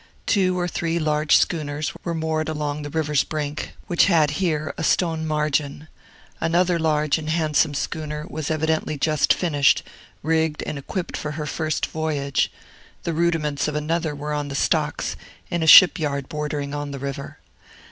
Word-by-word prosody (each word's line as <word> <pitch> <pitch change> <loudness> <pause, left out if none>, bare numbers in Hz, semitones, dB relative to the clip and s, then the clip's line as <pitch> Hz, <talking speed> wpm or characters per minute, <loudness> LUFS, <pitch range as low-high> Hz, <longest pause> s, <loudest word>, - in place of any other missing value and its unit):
Two 185 -3 +2
or 175 - 0
three 165 -1 -2
large 155 -1 +3
schooners 150 -2 -1
were 170 -1 -2
moored 160 -1 -1
along 150 -1 -3
the 145 - -6
river's 150 -2 +1
brink, 150 -1 -4
which 175 - +3
had 160 -6 +4
here 155 -4 0
a 165 - -4
stone 160 -1 +1
margin; 150 -1 -1 0.5
another 175 +1 +2
large 155 -1 +1
and 155 0 -6
handsome 155 -2 +1
schooner 150 0 -4
was 155 -2 -4
evidently 155 -1 0
just 155 +1 +2
finished, 145 -6 +3 0.4
rigged 160 0 0
and 145 - -4
equipped 175 +6 -4
for 150 0 -4
her 150 +1 -4
first 155 +1 -1
voyage; 150 -3 -1 0.5
the 170 - -2
rudiments 155 -4 0
of 150 - -3
another 160 0 -1
were 150 +1 -4
on 145 -1 -2
the 140 - -5
stocks, - - 0 0.4
in 170 - 0
a 160 - 0
shipyard 150 -6 +7
bordering 150 -1 -3
on 145 0 -3
the 140 - -5
river. 140 0 -6
155 Hz, 160 wpm, -23 LUFS, 145-160 Hz, 0.5 s, shipyard